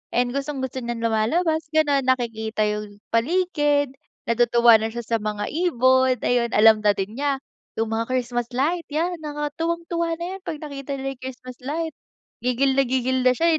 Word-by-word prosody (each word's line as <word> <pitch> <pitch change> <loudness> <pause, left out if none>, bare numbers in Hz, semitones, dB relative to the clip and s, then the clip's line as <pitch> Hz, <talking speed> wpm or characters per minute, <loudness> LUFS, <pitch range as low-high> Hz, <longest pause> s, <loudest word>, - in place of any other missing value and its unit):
and 245 0 +2
gustong-gusto 270 -2 -3
niyang 235 -1 -4
lumalabas 315 +9 +1
ganon 285 -4 +3
nakikita 225 -4 0
'yung 210 -1 -3
paligid. 295 +1 +1 0.3
Natutuwa 235 -1 +5
na 220 - -1
siya 235 +1 -5
sa 230 +1 0
mga 210 -1 -3
ibon, 260 -6 +3
ayun, 245 -1 +2
alam 220 0 +7
na 205 -1 +3
din 210 +6 -4
niya 280 -1 -1 0.3
'yung 225 0 -1
mga 225 +1 -1
Christmas 245 -2 -1
light, 330 +6 0
'yan 335 +4 -1
nakaka 295 -1 -4
tuwang-tuwa 335 0 -1
na 340 - -7
'yun 385 - -6
kapag 310 -1 -5
nakita 280 -1 -5
niya 270 0 -3
'yung 265 - -11
Christmas 255 -1 -9
light. 315 +5 -3 0.5
Gigil 250 +2 +1
na 270 -1 +2
gigil 260 0 +1
na 255 - +4
siya 335 +3 +3
260 Hz, 170 wpm, -23 LUFS, 230-295 Hz, 0.5 s, alam